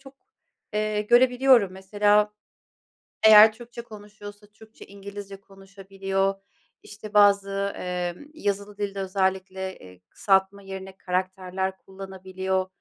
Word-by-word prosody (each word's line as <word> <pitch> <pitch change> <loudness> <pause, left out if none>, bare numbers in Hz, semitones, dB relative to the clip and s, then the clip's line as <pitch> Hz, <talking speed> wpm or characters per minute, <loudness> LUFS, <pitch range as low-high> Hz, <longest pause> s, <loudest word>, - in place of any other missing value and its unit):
çok, 270 0 -15 0.6
eee, 210 0 -1
görebiliyorum. 245 -2 +4
Mesela 205 +2 +1 0.9
eğer 215 0 +9
Türkçe 235 +1 -11
konuşuyorsa, 205 -1 -12
Türkçe-İngilizce 200 -2 -11
konuşabiliyor. 195 0 -4 0.5
İşte 210 0 -11
bazı, 200 -1 +3
eee, 180 -1 -3 0.2
yazılı 205 -6 -3
dilde 200 -1 -3
özellikle, 190 0 -2
eee, 90 -1 -15
kısaltma 195 0 +1
yerine 190 0 -9
karakterler 185 0 -3
kullanabiliyor. 190 -1 -4
195 Hz, 95 wpm, -25 LUFS, 190-210 Hz, 0.9 s, eğer